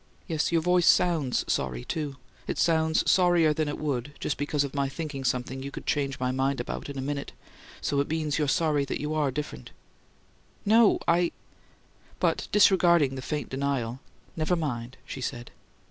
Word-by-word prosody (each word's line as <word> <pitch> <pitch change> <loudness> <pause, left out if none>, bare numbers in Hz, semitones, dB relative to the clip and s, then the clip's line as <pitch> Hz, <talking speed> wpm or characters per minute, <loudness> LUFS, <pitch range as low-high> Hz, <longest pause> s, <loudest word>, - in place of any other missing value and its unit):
Yes, 160 -1 0
your 165 -1 +2
voice 180 0 +3
SOUNDS 160 -8 +3
sorry, 60 -2 -1
too. 150 -4 -3 0.3
It - - -2
sounds 160 -1 +2
sorrier 175 -4 +4
than 155 0 -1
it 145 - -3
would 145 -2 -3
just 145 - -1
because 145 0 0
of 140 - -5
my 140 -1 0
thinking 145 -2 -5
something 130 +1 -1
you 140 - -5
could - - -8
change 140 -2 -1
my 125 0 0
mind 135 +1 0
about 120 - -5
in 140 - -6
a - - -2
minute 140 0 -4 0.5
so 140 - 0
it 140 - 0
means 155 -1 -1
you're 150 - +1
sorry 150 0 +2
you 150 +1 -2
ARE 150 -3 +1
different." 130 - -5 1.0
"No 220 +1 +5
I 170 0 +3 0.4
" - - -31
But - - +1
disregarding 170 -8 +5
the 130 - -5
faint 145 -1 -3
denial, 130 -3 -2 0.4
"Never 160 +2 +1
mind," 130 -6 -4
she 135 - -7
said. 120 -1 -5
145 Hz, 175 wpm, -27 LUFS, 135-160 Hz, 1.0 s, No